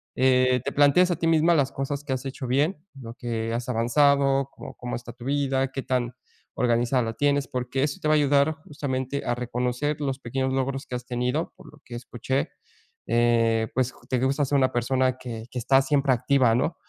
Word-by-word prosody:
eh, 130 -1 +3
te 140 - -1
planteas 145 +6 +4
a - - +1
ti 165 - 0
misma 165 +1 +4
las 140 -3 +1
cosas 140 +1 -4
que 140 -2 -2
has 130 +1 -4
hecho 135 -1 -5
bien, 150 +6 0 0.2
lo 115 -1 -8
que 115 -3 -3
has 120 +2 -3
avanzado. 135 +3 +3
Cómo - - -10
cómo 125 0 -5
está 120 0 -10
tu 120 0 -12
vida, 135 -1 0
qué 135 - -4
tan 125 -2 -1 0.4
organizada 120 +1 +2
la 115 0 -3
tienes. 145 +1 +1
Porque 125 +2 -2
eso 145 -1 -2
te 155 - -1
va 155 - +5
a - - +4
ayudar 145 +2 +3
justamente, 140 -1 -3
a 120 - 0
reconocer 125 +4 -2
los 135 -2 -2
pequeños 130 +1 -2
logros 135 +1 -2
que 125 - -5
has 125 - -6
tenido 125 +5 -2
por - - -14
lo 150 - -18
que 120 - -8
escuché, 125 +2 -3 0.6
eh, 115 -1 +2
pues, 130 -1 +1
j - - -21
te 130 - +1
gusta 135 +3 +1
ser 140 +1 +1
una 130 -1 +2
persona 130 +1 +1
que 115 -3 -7
que 125 - -4
está 135 +3 +4
siempre 140 -1 +1
activa, 125 -1 +3
¿no?, 160 +8 0
130 Hz, 210 wpm, -25 LUFS, 120-140 Hz, 0.6 s, va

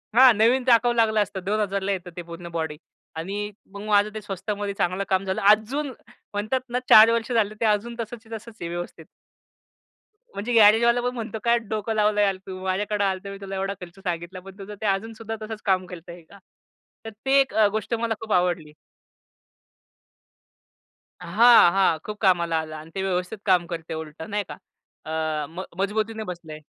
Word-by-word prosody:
हां, 255 0 +8
नवीन 240 +4 +4
टाकावं 240 -1 +4
लागलं 220 -2 +3
असतं, 195 -2 -4
2000ला 200 -1 -1
येतं 185 -2 -4
ते 175 - -3
पूर्ण 170 +1 -9
बॉडी. 160 -2 -3 0.4
आणि 200 +6 -4 0.2
मग 200 - -7
माझं 205 0 +4
ते 215 - -6
स्वस्तामध्ये 205 0 -4
चांगलं 185 +3 0
काम 190 0 +2
झालं. 190 -1 -2
अजून 250 +8 +2 0.4
म्हणतात 215 +6 -1
ना, 245 +1 0
4 220 +1 +9
वर्ष 230 +1 -1
झाले, 215 -3 +1
ते - - +1
अजून 215 +2 +1
तसच्या 225 0 -6
तसंच 220 +1 -13
आहे 170 - -4
व्यवस्थित. 175 +1 -6 1.3
म्हणजे 235 +4 -3
गॅरेजवाला 230 +2 +6
पण 245 +1 -1
म्हणतो, 230 -1 -5
"काय 235 0 +4
डोकं 220 -1 -3
लावलं 210 -1 +2
यार 200 -2 +2
तू, 185 -1 -6
माझ्याकडे 205 +2 -1
आला 195 -1 +2
होता, 190 +1 -8
मी 200 - -7
तुला 195 0 -6
एवढा 195 +1 -2
खर्च 180 +2 -11
सांगितला, 175 +1 -4
पण 195 +1 -13
तुझं 200 +2 -8
ते - - -3
अजून 200 +3 0
सुद्धा 225 0 -6
तसंच 215 0 -6
काम 185 -2 +2
करतंय 175 -1 -10
का?" 200 - -15 0.7
तर 225 - -4 0.2
ते 270 +1 +5
एक 270 - +1 0.2
गोष्ट 220 +2 -3
मला 230 0 0
खूप 220 -1 -3
आवडली. 175 -4 +1 2.5
हां, 235 -5 +6
हां, 190 -3 +3
खूप 210 0 -6
कामाला 170 -4 +3
आलं 155 0 -8
आणि 155 +1 -10
ते 190 - -2
व्यवस्थित 180 +2 -2
काम 180 -3 +3
करते 165 -2 -6
उलट, 160 -1 -7
नाही 205 +5 -2
का? - - -8 0.5
अ, 155 -1 -2
म 175 +3 -6 0.2
मजबुतीने 220 +2 -1
बसलंय. 160 -3 -11
205 Hz, 180 wpm, -24 LUFS, 180-220 Hz, 2.5 s, 4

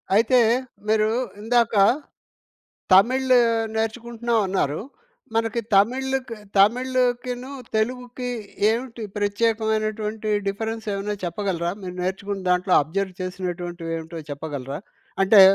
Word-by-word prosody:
అయితే, 235 +4 +5 0.5
మీరు 215 0 +3 0.3
ఇందాకా 225 -2 +3 1.1
తమిళ్ 255 +7 +5 0.4
నేర్చుకుంటున్నాం 235 +1 -1
అన్నారు. 160 -6 0 0.5
మనకి 225 +1 +1
తమిళ్‌కి 255 +4 +1 0.2
తమిళకిను, 250 +3 +2 0.3
తెలుగుకి 245 +2 -2 0.4
ఏమిటిి 235 +1 -2
ప్రత్యేకమైనటువంటి 215 0 0 0.2
డిఫరెన్సేమైనా 210 0 -2
చెప్పగలరా? 175 -1 -1
మీరు 180 -1 -6
నేర్చుకుని 195 +2 -3
దాంట్లో 180 +1 +2
అబ్జర్వ్ 190 +5 -3
చేసినటువంటివేమిటో 175 -3 -4
చెప్పగలరా? 140 -1 -5 0.4
అంటే 195 +1 +7
215 Hz, 80 wpm, -23 LUFS, 185-235 Hz, 1.1 s, అంటే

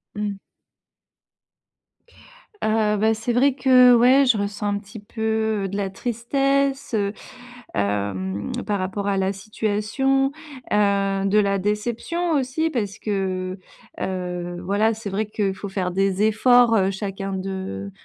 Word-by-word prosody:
Mmh. 210 -1 -2 2.3
Heu, 215 -1 +2
bah, 220 +1 +3
c'est 225 +2 -2
vrai 265 +2 +4
que, 250 -2 +6
ouais, 255 +4 +5
je 235 -4 +4
ressens 205 0 -3
un 205 0 0
petit 205 +2 -10
peu, 220 0 -1
heu, - - -1
de 195 - -6
la 195 -1 -1
tristesse, 270 +5 -1
heu 200 -2 0 0.6
hem, 100 -1 -2
par 205 -1 -1
rapport 190 +2 -3
à 200 -1 +1
la 190 +1 0
situation. 215 +7 0 0.4
Heu, 200 -1 +2
de 195 +2 +2
la 200 -1 +2
déception 230 - -2
aussi, 285 +3 0
parce 215 -9 -3
que, 185 -2 -3 0.4
heu, 180 -1 -4
voilà, 205 +4 +2
c'est 215 -2 -6
vrai 205 +3 -1
qu'il 205 -2 -1
faut 200 - -7
faire 190 -2 -2
des 195 +1 +1
efforts, 235 +2 +5
heu, 190 0 +2
chacun 195 0 -4
de 190 - -5
205 Hz, 140 wpm, -23 LUFS, 195-230 Hz, 2.3 s, que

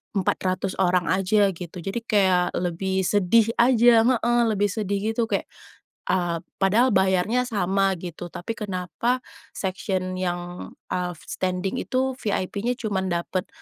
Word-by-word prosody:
400 185 0 0
orang 180 -3 +2
aja 195 +2 +3
gitu, 175 0 -8
jadi 195 +5 -3
kayak 190 -5 +2
lebih 185 +2 -1
sedih 205 +4 +3
aja 235 -2 +6
heeh, 240 -1 +2
lebih 205 -2 +1
sedih 200 0 -2
gitu. 230 0 +1
Kayak, 225 - -2 0.6
eee, 175 -2 0 0.2
padahal 215 +7 +3
bayarnya 190 +6 +2
sama 195 -3 +1
gitu. 175 0 -7
Tapi, 175 +4 -6
kenapa 205 +5 -2 0.3
section 185 -1 -2
yang, 175 -1 -4 0.2
eee, 180 -1 -1
standing 185 +5 -2
itu 260 +1 -1
VIP-nya 205 +3 -1
cuman 200 -6 -2
dapet 180 +2 -2
190 Hz, 130 wpm, -24 LUFS, 180-220 Hz, 0.6 s, aja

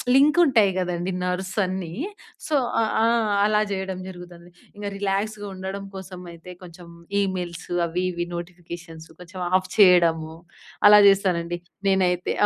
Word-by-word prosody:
లింకుంటాయి 275 - +5
గదండీ 180 0 -2
నర్వ్సన్నీ. 185 0 -2 0.6
సో 310 - 0 0.2
ఆ! - - +3 0.2
ఆ! - - +4 0.4
అలా 210 0 +3
జేయడం 190 -1 -3
జరుగుతది. 175 -1 -11 0.3
ఇక 205 - -10
రిలాక్స్‌గా 205 +2 -2
ఉండడం 190 +1 -6
కోసమయితే 180 -2 -10
కొంచెం 175 -1 -12 0.3
ఈమెయిల్స్ 180 -3 -3 0.2
అవి 170 +2 -2
ఇవి 175 0 -3
నోటిఫికేషన్స్ 170 -1 -9
కొంచెం 180 +1 -10 0.2
ఆఫ్ 185 0 -6
చేయడము. 170 -5 +5 0.5
అలా 210 0 +9
చేస్తానండి 180 -3 +2 0.3
నేనైతే. 185 -2 +1
185 Hz, 115 wpm, -23 LUFS, 175-195 Hz, 0.6 s, అలా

